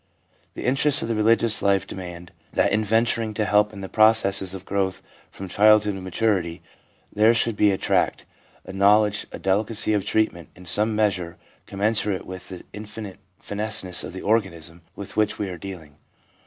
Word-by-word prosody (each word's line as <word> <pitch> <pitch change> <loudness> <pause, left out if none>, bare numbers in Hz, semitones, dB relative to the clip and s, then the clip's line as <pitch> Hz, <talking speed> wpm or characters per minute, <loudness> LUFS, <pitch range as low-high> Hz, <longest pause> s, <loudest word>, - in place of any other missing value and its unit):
The - - -6
interests 140 +3 +3
of 115 - -4
the - - +1
religious 110 +1 +2
life 100 -1 +2
demand 90 -2 -9 0.2
that - - +2
in 110 +1 +2
venturing 115 0 +1
to 105 - 0
help 105 0 +3
in 100 -2 -10
the 95 - -6
processes 100 -3 +2
of 95 0 -10
growth 95 -1 -1 0.3
from 95 - -9
childhood 105 +2 +4
to 95 - -7
maturity 95 -3 -1 0.5
there 110 +3 +4
should 115 -1 +1
be 105 - +4
a 95 - 0
tact, - - 0 0.4
a - - -9
know 100 +2 +5
ledge, 105 -1 -2
a - - -7
delicacy 105 +3 0
of 100 -2 0
treatment, 100 -5 -1
in 90 - -14
some 105 +5 +2
measure 95 -6 -1 0.3
com 100 0 -8
mensurate 105 -2 +1
with 95 0 -9
the 90 -2 -9
infinite 105 -2 -8 0.2
fineness 105 -3 0
of - - -7
the 95 - -7
organism 85 -6 -1
with 100 - -8
which 105 -1 +1
we 100 - -3
are 90 - -6
dealing. 85 -7 -10
105 Hz, 180 wpm, -23 LUFS, 95-110 Hz, 0.5 s, know